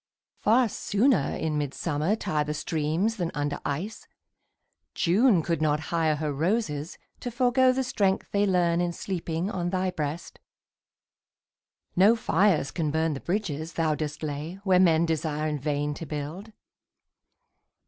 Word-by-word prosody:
Far 235 +3 +4
sooner 205 - +1
in 155 -2 -1
midsummer 150 +5 -1
tire 155 -8 -1
The 150 +1 -3
streams 160 +8 -1
than 175 -3 -1
under 145 0 -2
ice. 175 +10 -4 0.9
June 190 0 +3
could 165 -1 -1
not 150 -1 +2
hire 160 -2 +2
Her 150 -1 -2
roses 160 -1 -1 0.2
to 245 - -4
forego 250 +2 +3
the 265 +1 0
strength 195 -6 0
they 205 0 +2
learn 175 -2 +2
In 175 -1 -1
sleeping 175 0 -3
on 175 -4 -2
thy 185 0 0
breast. 155 +1 -5 1.6
No 200 +6 +6
fires 195 - +2
can 160 -4 -1
burn 160 +1 0
The 135 - -5
bridges 165 -4 -3
thou 160 -2 +1
dost 150 0 -4
lay 150 +3 -4
where 185 -2 +4
men 170 -2 +4
desire 155 -1 -1
In 150 -1 -2
vain 145 +1 -1
to 160 +2 -7
build. 155 +9 -6
165 Hz, 145 wpm, -27 LUFS, 150-195 Hz, 1.6 s, No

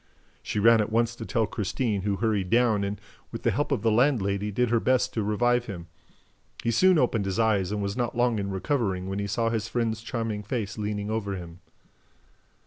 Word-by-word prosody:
She - - -4
ran 115 +1 +6
at 105 - -3
once 115 +1 +1
to 115 - -7
tell 115 -3 +1
Christine, 105 +1 -2
who 100 +1 0
hurried 100 -3 0
down 115 -3 +3
and, 100 +1 -3 0.3
with - - -7
the - - +3
help - - -1
of - - 0
the 115 - +3
landlady, 105 -5 +2
did 115 +3 0
her 120 - +3
best 130 +2 +1
to 110 - -1
revive 120 +4 +1
him. 85 -5 -7 0.7
He 115 - +1
soon 185 +9 +5
opened 120 -7 +1
his 95 0 -2
eyes 105 -5 +2
and 105 -1 -2
was 100 0 -2
not 120 -1 -2
long 120 -3 +2
in 100 0 -3
recovering 95 -3 -1
when 95 +1 -3
he 100 - -2
saw 115 +3 0
his 110 -2 -2
friend's 115 -2 -1
charming 115 -3 -3
face 105 -2 -3
leaning 105 0 -3
over 100 -3 -2
him. 85 -1 -9
110 Hz, 210 wpm, -26 LUFS, 100-115 Hz, 0.7 s, ran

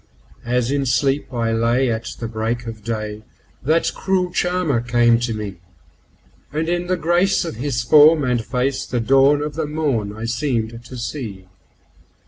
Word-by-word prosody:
As 125 +1 +1
in 140 -1 0
sleep 135 +3 +1
I 115 -2 -1
lay 120 +3 +2
at 110 0 -3
the 115 - -3
break 115 +2 -3
of 110 -2 -8
day 110 -2 -4 0.4
that 160 +5 +1
cruel 185 -2 0
charmer 175 -8 0
came 120 -1 +3
to 120 -1 -2
me, 105 -3 -5 0.9
And 155 +2 -2
in 175 +1 -1
the 185 0 0
grace 175 +3 +2
of 165 - -6
his 125 -2 -2
form 150 +4 +6
and 125 -3 0
face 130 +3 -1
the 125 - -1
dawn 135 +4 +4
of 150 0 -4
the 155 0 -2
morn 140 -9 -1
I 110 - -5
seemed 115 -2 -2
to 125 - -9
see. 115 -7 -5
125 Hz, 165 wpm, -20 LUFS, 115-150 Hz, 0.9 s, form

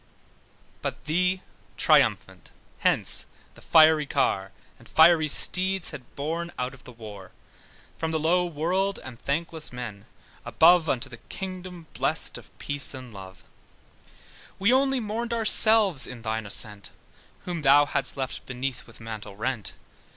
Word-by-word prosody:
But - - -6
thee 180 +4 0 0.3
triumphant - - +1 0.3
hence - - +1 0.3
the - - -18
fiery 155 -2 +4
car, 95 -7 -1 0.3
And - - -17
fiery 160 -1 +5
steeds 185 +4 +5
had 125 - -12
borne 165 +4 -4
out 125 +1 -4
of 135 - -17
the - - -11
war, 105 -5 -11 0.7
From 160 - -2
the 160 - -1
low 175 +3 +2
world, 180 +5 -1
and 125 -3 -11
thankless 160 +2 -3
men 120 -5 -8 0.4
above, 165 -1 +4
Unto 120 - -2
the 120 - -12
kingdom 185 +4 -9
blest - - -1
of - - -20
peace 145 -1 +1
and 130 -3 -11
love: 95 -1 -12 1.1
We 200 +6 +2
only 270 0 +2
mourned 230 +2 -4
ourselves, 215 - +3
in 125 -3 -10
thine 110 -1 -3
ascent, 100 0 0 0.6
Whom 175 -3 -4
thou 145 +1 +5
hadst 140 -1 +1
left 130 -1 -5
beneath 130 0 -5
with 115 - -17
mantle 110 -3 -8
rent. 110 +1 -3
150 Hz, 140 wpm, -25 LUFS, 120-180 Hz, 1.1 s, fiery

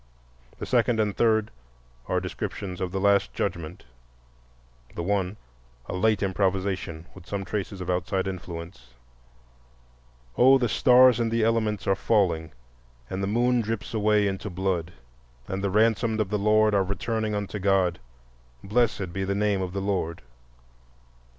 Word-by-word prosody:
The - - -5
second 120 -2 +2
and 105 -2 0
third 110 -2 +2 0.6
are - - +1
descriptions 95 -3 -5
of 90 -1 -2
the 95 - -2
Last 100 0 +2
Judgment,—the - - -8
one 100 +1 -1 0.5
a - - -6
late 105 +3 +1
improvisation, 95 -3 -1
with 85 - -14
some 100 -1 -4
traces 100 -2 -4
of 90 - -5
outside 95 +1 -1
influence: 85 -9 -8 1.4
"Oh, 130 +2 +7
the 125 -2 0
stars 125 +1 +5
in 115 -1 +1
the 115 0 +1
elements 110 -2 0
are 95 - +3
falling, 90 -6 +1 0.6
And 95 - -3
the 95 - -1
moon 120 +3 +2
drips 115 0 -4
away 105 -1 +2
into 100 +2 -3
blood, 90 -2 -2 0.6
And 95 +1 -4
the 100 - +1
ransomed 110 +2 +2
of 105 -3 0
the 105 - 0
Lord 110 +1 +3
are 100 -1 +3
returning 110 +3 -2
unto 105 0 -4
God, 95 -3 +2 0.6
Blessed 105 -4 0
be 95 +1 -2
the 100 +1 -1
name 100 -1 +1
of 90 -1 -3
the 100 +1 -3
Lord." 95 -6 -2
100 Hz, 145 wpm, -26 LUFS, 90-110 Hz, 1.4 s, Oh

